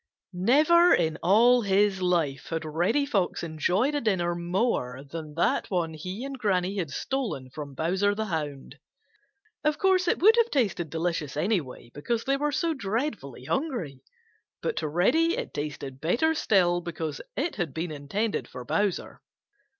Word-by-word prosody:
—Old 180 +1 -4
Granny 265 +5 +6
Fox. - - -10
Never 340 +1 +7
in 160 -2 0
all 235 +6 +5
his 200 -1 +2
life 165 -8 0
had 165 -1 -3
Reddy 175 - +1
Fox 195 -11 -1
enjoyed 180 - 0
a 290 - 0
dinner 180 -6 +1
more 170 - -1
than 155 0 -7
that 170 - +1
one 170 -4 -1
he 185 - -6
and 275 -1 -6
Granny 195 -2 0
had 165 -5 -2
stolen 195 - -3
from 145 -2 -8
Bowser 190 +7 +1
the 220 +1 -2
Hound. 150 -7 -5 0.8
Of 300 0 +1
course 375 -1 +2
it - - +2
would 440 +6 +6
have 470 0 +4
tasted 195 - 0
delicious 160 -2 -2
anyway, 150 - -2
because 225 +11 -2
they 275 - +1
were 295 +2 0
so 335 +2 0
dreadfully 210 - -3
hungry, 220 - -2 0.6
but 465 - -1
to - - -1
Reddy 315 - +2
it - - -5
tasted 140 -2 -5
better 240 - +2
still 180 - +2
because 160 -3 -5 0.2
it 310 +6 -1
had 175 -7 -2
been 160 +4 -4
intended 175 +10 -2
for 125 -1 -9
Bowser. 205 +6 -1
180 Hz, 165 wpm, -27 LUFS, 155-245 Hz, 0.8 s, Never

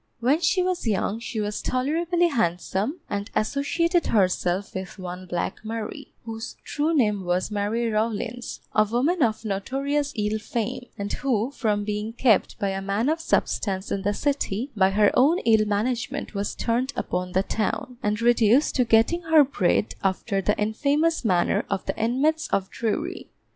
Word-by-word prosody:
When 270 +7 +2
she 365 +2 +2
was 365 -8 -1
young, 210 +1 0
she 230 -1 -5
was 210 0 -2
tolerably 335 +7 +1
handsome, 225 - -1
and 205 +1 -3
associated 335 - +1
herself 185 -1 +1
with 190 -1 -6
one 185 0 -7
Black 175 +1 -2
Mary, 225 0 -6
whose 225 +1 -6
true 300 +3 -1
name 210 - +2
was 180 +3 -1
Mary 210 +3 0
Rawlins, 225 +2 -2
a 215 - +5
woman 255 - 0
of 225 -2 +1
notorious 275 +8 -1
ill 210 0 -1
fame, 240 +3 -3
and 200 0 -3
who, 245 -2 0
from 215 -7 0
being 210 +2 -3
kept 235 -4 +2
by 200 - -1
a 195 0 -3
man 200 +7 0
of 325 +1 0
substance 195 -10 -1
in 195 - -1
the 205 +1 0
City, 275 -3 -1
by 190 -2 +4
her 205 +1 +4
own 290 +7 +4
ill 220 -2 +4
management 225 +4 -2
was 200 0 -2
turned 250 +4 -1
upon 180 0 -3
the 190 - +2
town, 225 +4 -2
and 210 +2 -1
reduced 240 +3 +4
to 250 - +3
getting 225 +10 +3
her 320 -2 +6
bread 210 -7 +1
after 195 +1 0
the 210 +2 +1
infamous 285 +10 +1
manner 180 -6 +2
of 195 -1 -2
the - - -2
inmates 280 +8 +1
of 190 -1 -1
Drury. 270 - -3
225 Hz, 165 wpm, -25 LUFS, 205-275 Hz, -, her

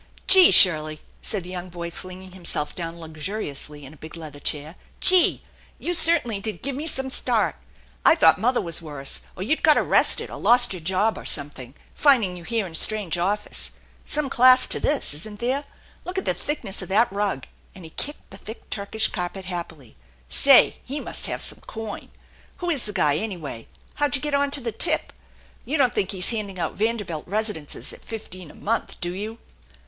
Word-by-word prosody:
" - - -25
Gee, 380 -2 +9
Shirley! 155 -4 +5
" - - -32
said 205 -5 0
the 180 +1 -8
boy, 170 -1 -6
flinging 185 +1 -9
himself 170 -5 -2
down 170 -1 -6
luxuriously 155 -3 -6
in 135 - -11
a - - -17
big 155 +3 -10
leather 155 -3 -9
chair. 150 +3 -4
" - - -32
Gee! 370 -1 +5 0.3
You 355 - -3
certainly 320 - +3
did 215 +1 -4
give 275 0 -2
me 300 +4 -4
some 265 -3 0
start! - - +1 0.5
I - - +6
thought 320 - +5
mother 250 +2 +2
was 170 -3 0
worse, 145 -4 -3
or 185 - -5
you'd 310 +10 0
got 305 -3 +5
arrested, - - +2
or - - -7
lost 245 -2 +4
your 185 - -6
job, 190 +6 0
or - - -11
something, 140 -3 -5 0.2
finding 235 -11 +3
you 175 - -10
here 225 +2 -1
in 180 - -8
a - - -15
strange 185 0 0
office. 205 +4 -1 0.4
Some 300 -1 -1
class 255 -1 +6
to - - +3
this, 290 - 0
isn't 205 +8 -7
there? 265 +4 -1 0.4
Look 360 +2 -6
at 380 - -2
the - - +2
thickness 235 -11 -5
of 185 - -8
that 220 +3 +2
rug! 200 -9 -2
" - - -31
and 185 - -12
he 160 - -10
kicked 290 - -5
the 195 - -9
thick 215 +4 -11
Turkish 215 +2 0
carpet 185 0 -5
happily. 170 -9 -7 0.2
" - - -33 0.2
Say, 275 -2 +7
he 280 +3 -4
must - - -1
have - - -1
some - - 0
coin! 220 -2 -7 0.5
Who 350 -1 -2
is 280 -7 0
the 210 - -4
guy, 150 -7 +2
anyway? 165 - -5 0.3
How'd 290 -2 0
ya 265 - -2
get 295 -1 -2
onto 280 0 +2
the 235 -1 -3
tip? 215 - +1 0.5
You 305 - -2
don't 255 -4 +3
think 190 - -1
he's 185 -3 -1
handing 210 -4 -4
out 175 - -2
Vanderbilt 205 -8 -2
residences 205 -6 -3
at - - -14
fifteen 185 -6 -7
a - - -14
month, 230 +3 -2
do 175 0 -3
you?" 215 +4 -6
200 Hz, 205 wpm, -24 LUFS, 170-245 Hz, 0.5 s, Gee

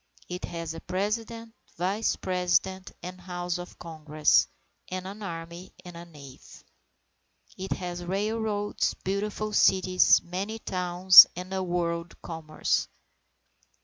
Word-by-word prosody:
It 180 0 -5
has 165 -1 -6
a 165 - -9
President, 225 +4 -4 0.2
Vice 195 +6 0
President, 185 +1 -1
and 180 0 -8
House 175 -1 -4
of 175 - -10
Congress, 155 - +1 0.4
and 185 0 -5
an 200 +3 -8
army 170 -1 -8
and 175 -1 -10 0.2
navy. 140 -4 -13 1.2
It 190 +1 -4
has 175 -1 -6
railroads, 205 +2 -2
beautiful 210 +2 -3
cities, 185 -2 +4
many 195 +5 -4
towns, 180 -2 +7
and 180 +1 -7
a 190 - -1
world 170 -1 -3
commerce. 160 -2 -2
180 Hz, 115 wpm, -27 LUFS, 170-195 Hz, 1.2 s, towns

